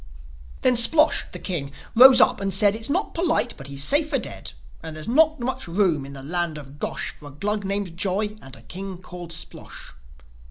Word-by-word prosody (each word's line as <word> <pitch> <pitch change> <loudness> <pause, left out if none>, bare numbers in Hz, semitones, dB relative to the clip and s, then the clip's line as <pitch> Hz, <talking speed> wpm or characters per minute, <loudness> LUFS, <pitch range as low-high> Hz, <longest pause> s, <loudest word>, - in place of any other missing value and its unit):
Then 250 - +4
Splosh, 300 +7 +5
the - - -6
king, 150 -7 -2 0.2
rose 255 +2 +8
up - - +3
and 195 0 -1
said, 200 +2 +3
"It's 225 +3 -4
not 365 +8 -1
polite; 330 -7 0
but 135 - -10
he's 140 0 -1
safer 300 - +3
dead. - - -6 0.3
And 160 -1 -8
there's 155 - -8
not 315 +5 +3
much 260 0 -4
room 170 -6 0
in 140 - -10
the 135 -1 -9
land 170 +1 -2
of 145 0 -12
Gosh - - -3
For 150 - -13
a - - -9
Glug 205 +8 -2
named 195 -3 -3
Joi 205 +3 -1
and 135 0 -10
a - - -15
king 190 0 -7
called 175 -1 -10
Splosh!" 165 - -7
195 Hz, 200 wpm, -23 LUFS, 155-240 Hz, 0.3 s, rose